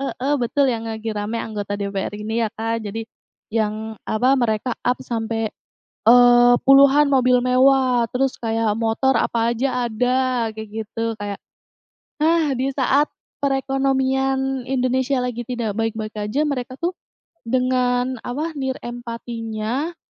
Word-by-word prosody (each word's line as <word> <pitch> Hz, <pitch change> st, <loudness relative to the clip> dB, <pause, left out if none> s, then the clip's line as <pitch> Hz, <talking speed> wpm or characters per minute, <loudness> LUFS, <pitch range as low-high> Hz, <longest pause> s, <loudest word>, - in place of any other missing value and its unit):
heeh, 275 Hz, +1 st, -1 dB
betul 270 Hz, +3 st, +2 dB
yang 230 Hz, -2 st, -2 dB
lagi 220 Hz, 0 st, -5 dB
rame 210 Hz, +3 st, -2 dB
anggota 205 Hz, -2 st, -4 dB
DPR 200 Hz, 0 st, -3 dB
ini 220 Hz, +2 st, -2 dB
ya 220 Hz, -, -1 dB
Kak, 225 Hz, 0 st, -3 dB
jadi, 220 Hz, +2 st, -4 dB, 0.5 s
yang 220 Hz, 0 st, -2 dB
apa 245 Hz, +5 st, +2 dB
mereka 235 Hz, -1 st, 0 dB
up 250 Hz, -, +1 dB
sampai, 225 Hz, -1 st, -2 dB, 0.6 s
eee, 245 Hz, 0 st, +7 dB
puluhan 280 Hz, +2 st, +6 dB
mobil 255 Hz, -2 st, +4 dB
mewah 255 Hz, -1 st, +4 dB
terus 265 Hz, +1 st, +1 dB
kayak 225 Hz, -2 st, 0 dB
motor 230 Hz, +4 st, +1 dB
apa 235 Hz, 0 st, +1 dB
aja 250 Hz, 0 st, -1 dB
ada 250 Hz, +1 st, 0 dB
kayak 220 Hz, -1 st, -7 dB, 0.2 s
gitu 225 Hz, +1 st, -3 dB
kayak, 205 Hz, -1 st, -4 dB, 0.9 s
ah, 320 Hz, -3 st, +3 dB
di 260 Hz, +2 st, 0 dB
saat 275 Hz, +2 st, +2 dB, 0.3 s
perekonomian 270 Hz, -1 st, 0 dB
Indonesia 260 Hz, 0 st, 0 dB
lagi 240 Hz, -1 st, -3 dB
tidak 230 Hz, -4 st, -3 dB
baik-baik 220 Hz, -1 st, -2 dB
aja 210 Hz, +7 st, -1 dB
mereka 255 Hz, -3 st, -3 dB
tuh, 345 Hz, +2 st, 0 dB, 0.5 s
dengan 250 Hz, 0 st, +1 dB
apa 300 Hz, +7 st, -3 dB
nirempatinya, 240 Hz, +2 st, -4 dB
245 Hz, 130 wpm, -21 LUFS, 225-265 Hz, 0.9 s, eee